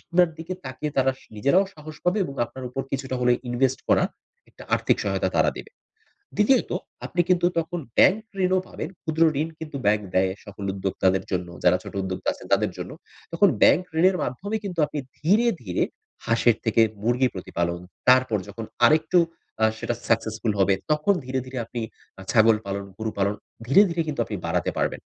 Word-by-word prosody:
আপনার 175 0 +3
দিকে 165 +3 -5
তাকিয়ে 135 +3 -4
তারা 135 0 +3 0.2
নিজেরাও 140 - +3
সাহস 155 0 -10
পাবে 180 +4 +2
এবং 140 - -6
আপনার 130 +2 -9
উপর 135 +2 -3
কিছুটা 130 -1 -2
হলে 125 0 +4 0.2
ইনভেস্ট 130 +2 +1
করা - - +4 0.5
একটা - - -14
আর্থিক - - +2
সহায়তা - - 0
তারা - - +4
দেবে। - - -9 0.7
দ্বিতীয়ত 225 +5 +3 0.4
আপনি 175 - -2
কিন্তু 175 -1 +3
তখন 165 +2 -2 0.2
ব্যাংক 200 +4 +6 0.2
ঋণও 185 0 +3
পাবেন, 155 - -5
ক্ষুদ্র 160 0 0 0.2
ঋণ 160 - 0
কিন্তু 155 -3 -6
ব্যাংক 105 0 +3
দেয়, 95 0 +3
সকল 100 -1 -9
উদ্যোক্তাদের 95 -1 0
জন্য 90 -1 -1 0.2
যারা - - +6
ছোট - - -10
উদ্যোক্তা 95 -1 -4
আছেন - - -12
তাদের - - 0
জন্য। - - -5 0.4
তখন - - +5
ব্যাংক 175 - +6 0.2
ঋণের 185 +2 +5
মাধ্যমে 200 +11 -3
কিন্তু 180 -4 -5
আপনি 150 0 -5 0.2
ধীরে, 205 +10 +3 0.2
ধীরে 90 -5 -1 0.4
হাঁসের 115 0 +3
থেকে 115 0 +4 0.2
মুরগি 125 +3 +2
প্রতিপালন, 85 -2 -3 0.3
তারপর 130 -3 +5
যখন 110 +3 -7 0.2
আরেকটু 160 +4 +4 0.4
আ - - +7
সেটা 120 - -2
সাকসেসফুল 110 -1 0
হবে 95 0 +4 0.2
তখন 150 +7 +3
ধীরে, 130 +1 -2
ধীরে 130 0 -6
আপনি 120 +1 -6 0.4
আ - - -8
ছাগল 110 -1 +6
পালন, 100 0 -3
গরু 110 0 -2
পালন 100 +1 +1 0.3
ধীরে, 140 +11 +7
ধীরে 170 0 0
কিন্তু 145 -5 -2
আপনি 105 - -5
বাড়াতে 85 +1 0
পারবেন - - -1
130 Hz, 175 wpm, -24 LUFS, 105-165 Hz, 0.7 s, আ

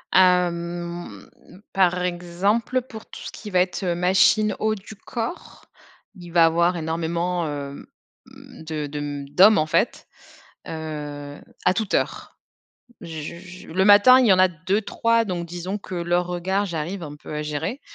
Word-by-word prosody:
Hem, 175 -1 +1 0.4
par 180 -2 +2
exemple 180 +8 0
pour 220 -3 -11
tout - - -11
ce - - -7
qui 210 - -9
va 185 -2 +2
être, 180 +2 0
heu, 175 -2 0
machine 190 +4 +3
haut 215 0 +1
du 205 +1 -11
corps, 230 - -6 0.5
il 175 -2 -11
va 170 -1 +6
avoir 170 +2 +2
énormément, 170 +2 -2
hem, 140 -1 -6 0.4
mmh, - - -14
de 155 -1 -4
de 145 -1 -5
d'hommes, 200 +7 +7
en 155 - +2
fait, 155 - 0 0.6
heu, 150 -2 -6 0.3
à - - +5
toute 220 -3 -2
heure. - - -2 0.6
J 160 -1 -7
je 185 0 -12
le 190 +4 +1
matin, 205 +5 +8
il 250 - +3
y 200 - +6
en 185 - +4
a 185 - +6
2-3, 210 +7 0
donc 175 -4 -4
disons 175 +4 -5
que 190 - -9
leurs 175 0 0
regards, 190 +3 -1
j'arrive 170 +2 -4
un 145 -1 -8
peu 150 - -10
à 150 - -2
gérer, 150 - -3
175 Hz, 160 wpm, -23 LUFS, 160-195 Hz, 0.6 s, matin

